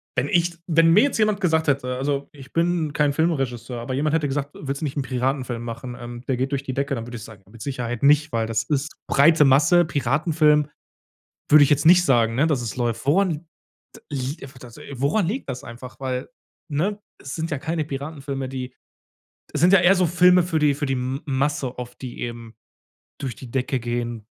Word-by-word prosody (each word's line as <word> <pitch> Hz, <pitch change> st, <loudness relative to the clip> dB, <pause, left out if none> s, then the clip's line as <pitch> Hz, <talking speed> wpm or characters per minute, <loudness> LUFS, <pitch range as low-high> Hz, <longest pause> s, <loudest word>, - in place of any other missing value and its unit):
wenn 125 Hz, +3 st, 0 dB
ich 170 Hz, -1 st, +1 dB
wenn 165 Hz, 0 st, +4 dB
mir 210 Hz, -, +7 dB
jetzt 285 Hz, -, 0 dB
jemand 215 Hz, -1 st, +1 dB
gesagt 160 Hz, -3 st, +1 dB
hätte- 130 Hz, -3 st, 0 dB
also, 140 Hz, +1 st, -2 dB
ich 140 Hz, -2 st, -14 dB
bin 165 Hz, -3 st, 0 dB
kein 150 Hz, -2 st, +2 dB
Filmregisseur- 135 Hz, -7 st, -1 dB
aber 130 Hz, +2 st, -4 dB
jemand 150 Hz, +3 st, 0 dB
hätte 155 Hz, -3 st, +1 dB
gesagt: 140 Hz, +1 st, -3 dB
„Willst 140 Hz, +1 st, -5 dB
du 155 Hz, -, -1 dB
nicht 135 Hz, -, -4 dB
'nen 145 Hz, -, 0 dB
Piratenfilm 130 Hz, -2 st, -2 dB
machen? 120 Hz, +1 st, -7 dB
Ähm, 120 Hz, 0 st, -8 dB
der 130 Hz, -, 0 dB
geht 130 Hz, +3 st, -1 dB
durch 140 Hz, -1 st, -1 dB
die 130 Hz, -2 st, -5 dB
Decke.“ 140 Hz, 0 st, -1 dB
Dann 115 Hz, 0 st, -6 dB
würde 120 Hz, -1 st, -7 dB
ich 110 Hz, -, -9 dB
sagen: 110 Hz, -4 st, -13 dB
„Mit 115 Hz, -1 st, -10 dB
Sicherheit 120 Hz, -3 st, -4 dB
nicht, 150 Hz, +2 st, +4 dB
weil 115 Hz, -1 st, 0 dB
das 115 Hz, -1 st, 0 dB
ist 150 Hz, 0 st, -2 dB
breite 155 Hz, +2 st, +5 dB
Masse.“ 150 Hz, +6 st, +5 dB
Piratenfilm, 150 Hz, +1 st, +2 dB, 0.8 s
würde 150 Hz, -1 st, +8 dB
ich 140 Hz, -, 0 dB
jetzt 145 Hz, +1 st, +2 dB
nicht 175 Hz, +1 st, +7 dB
sagen, 115 Hz, -5 st, +3 dB
ne, 140 Hz, +5 st, +2 dB
dass 145 Hz, -6 st, +1 dB
es 115 Hz, -4 st, -5 dB
läuft. 120 Hz, 0 st, -2 dB
Woran 185 Hz, +6 st, +3 dB
li 155 Hz, -, -2 dB, 0.6 s
t -, -, -13 dB
liegt 135 Hz, +2 st, -4 dB
einfach 130 Hz, -1 st, -11 dB
das 120 Hz, -2 st, -13 dB, 0.2 s
woran 140 Hz, -, +1 dB
liegt 230 Hz, -, -4 dB
das 125 Hz, -1 st, -5 dB
einfach? 120 Hz, +3 st, -10 dB
Weil 130 Hz, -1 st, -3 dB, 0.4 s
ne, 185 Hz, +8 st, -1 dB, 0.2 s
es 135 Hz, -, -6 dB
sind 165 Hz, +1 st, -3 dB
ja 145 Hz, -, -2 dB
keine 160 Hz, +1 st, -2 dB
Piratenfilme, 140 Hz, -1 st, -5 dB
die 130 Hz, -1 st, -6 dB, 0.8 s
es 150 Hz, -, -2 dB
sind 175 Hz, +4 st, +5 dB
ja 195 Hz, -, +7 dB
eher 185 Hz, +2 st, +5 dB
so 180 Hz, -1 st, +3 dB
Filme 180 Hz, +1 st, +5 dB
für 165 Hz, -3 st, -1 dB
die 150 Hz, -1 st, +3 dB
für 145 Hz, +1 st, -3 dB
die 135 Hz, -, -1 dB
M 130 Hz, +2 st, -3 dB
Masse 140 Hz, -2 st, -1 dB
oft, 125 Hz, 0 st, -8 dB
die 125 Hz, -2 st, -7 dB
eben 115 Hz, -1 st, -6 dB, 0.7 s
durch 130 Hz, -5 st, -4 dB
die 130 Hz, -, -11 dB
Decke 130 Hz, +1 st, -1 dB
gehen. 120 Hz, -1 st, -4 dB
140 Hz, 215 wpm, -23 LUFS, 125-155 Hz, 0.8 s, würde